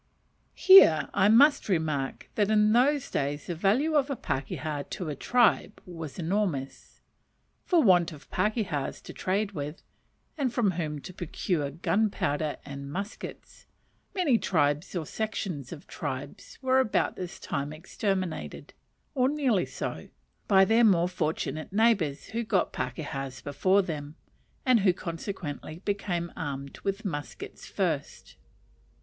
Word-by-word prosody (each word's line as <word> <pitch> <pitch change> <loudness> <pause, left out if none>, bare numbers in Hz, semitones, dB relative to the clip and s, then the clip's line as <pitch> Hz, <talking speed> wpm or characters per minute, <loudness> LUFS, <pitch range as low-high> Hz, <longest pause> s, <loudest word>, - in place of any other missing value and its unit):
Here 375 - +8
I 195 - +4
must 280 +3 +5
remark 155 -7 -1
that 205 -1 +1
in 215 0 +4
those 275 +3 +2
days 145 +1 -2
the 175 - -3
value 215 - +2
of 290 -2 +2
a 275 - -1
pakeha 145 - -3
to 175 -4 -4
a 150 - -3
tribe 240 - +2
was 165 -5 -8
enormous. 170 -6 -2 0.6
For 345 -4 +4
want 175 -6 +5
of 150 -2 -12
pakehas 210 - -1
to - - -9
trade 200 +2 -1
with, 150 -3 -6 0.6
and 265 -4 +1
from 230 -5 +2
whom 155 -4 -3
to 185 - -9
procure 170 -3 -2
gunpowder 170 -2 0
and 140 0 -7
muskets, 200 +6 -7 0.5
many 300 - +3
tribes 150 0 0
or 165 -3 -2
sections 180 - -4
of 160 -4 -9
tribes - - -6
were 260 0 +4
about 260 -5 +1
this 180 -1 -7
time 140 +1 -3
exterminated, 185 +2 -3 0.4
or 260 -2 +2
nearly 265 -10 +1
so, - - -5 0.4
by 190 -2 +6
their 225 +4 +4
more 180 -6 +5
fortunate 155 -1 -3
neighbours 200 -9 +2
who 230 +1 -2
got 200 -4 0
pakehas 130 0 -4
before 185 +9 +2
them, 150 -4 -5 0.5
and 255 -3 +5
who 190 -3 +4
consequently 165 -1 -6
became 180 -4 -2
armed 140 -2 -5
with 195 +2 -3
muskets 145 - -6
first. - - -3
180 Hz, 135 wpm, -28 LUFS, 150-215 Hz, 0.6 s, Here